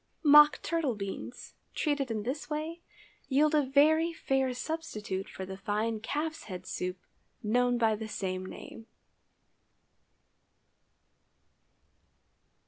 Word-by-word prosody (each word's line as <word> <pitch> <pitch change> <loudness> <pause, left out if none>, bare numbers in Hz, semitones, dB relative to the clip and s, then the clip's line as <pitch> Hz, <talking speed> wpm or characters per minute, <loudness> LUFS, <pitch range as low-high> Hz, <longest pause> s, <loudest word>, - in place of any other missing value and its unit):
Mock 295 0 +8
turtle 325 -8 0
beans, 200 +4 -7 0.2
treated 285 -4 0
in 215 -2 -2
this 270 +6 -4
way, 315 +3 -4 0.5
yield 295 +3 +3
a 305 - +5
very 305 +5 +4
fair 270 -5 0
substitute 235 -9 -4
for 190 - -7
the 190 0 -7
fine 210 +3 -1
calf's 310 +8 -3
head 185 -3 -7
soup 180 0 -3 0.5
known 245 +3 +2
by 225 -2 +3
the 220 +1 -6
same 185 -3 -3
name. 225 +4 -10
250 Hz, 110 wpm, -30 LUFS, 210-300 Hz, 0.5 s, Mock